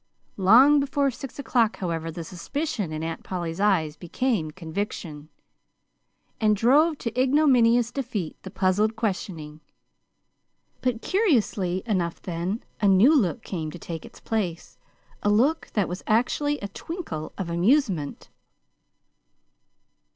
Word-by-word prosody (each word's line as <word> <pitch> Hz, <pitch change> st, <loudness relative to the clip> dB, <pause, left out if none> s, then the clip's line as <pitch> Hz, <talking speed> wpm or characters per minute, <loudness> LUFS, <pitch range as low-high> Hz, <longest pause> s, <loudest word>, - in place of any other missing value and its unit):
Long 245 Hz, +10 st, +6 dB
before 280 Hz, 0 st, +1 dB
six 255 Hz, +1 st, -9 dB
o'clock, 240 Hz, -5 st, +1 dB
however, 165 Hz, -3 st, -3 dB
the 165 Hz, +1 st, -6 dB
suspicion 205 Hz, -, -4 dB
in 155 Hz, 0 st, -4 dB
Aunt 165 Hz, 0 st, -4 dB
Polly's 175 Hz, -2 st, -4 dB
eyes 180 Hz, -7 st, +2 dB
became 185 Hz, -1 st, -1 dB
conviction, 160 Hz, -2 st, -5 dB, 1.1 s
and 215 Hz, -1 st, +3 dB
drove 290 Hz, +9 st, +4 dB
to 230 Hz, -4 st, -4 dB
ignominious 250 Hz, -3 st, +4 dB
defeat 235 Hz, -, -4 dB
the 190 Hz, -, -8 dB
puzzled 200 Hz, +4 st, +1 dB
questioning. 175 Hz, -8 st, -4 dB, 1.2 s
But, 245 Hz, -3 st, -1 dB
curiously 220 Hz, -, +1 dB
enough 180 Hz, -7 st, -1 dB
then, 180 Hz, +5 st, -3 dB, 0.2 s
a 205 Hz, -, +4 dB
new 200 Hz, +11 st, +6 dB
look 225 Hz, -, +1 dB
came 160 Hz, -5 st, -4 dB
to 175 Hz, -, -8 dB
take 165 Hz, -1 st, -7 dB
its -, -, -13 dB
place, 185 Hz, -7 st, -3 dB, 0.4 s
a 205 Hz, -, +1 dB
look 260 Hz, +10 st, +2 dB
that 205 Hz, -4 st, +1 dB
was 180 Hz, +2 st, -5 dB
actually 290 Hz, +6 st, +1 dB
a 200 Hz, -, -3 dB
twinkle 200 Hz, -, -6 dB
of 180 Hz, -3 st, -4 dB
amusement. 180 Hz, -, +1 dB
205 Hz, 125 wpm, -25 LUFS, 170-250 Hz, 1.2 s, Long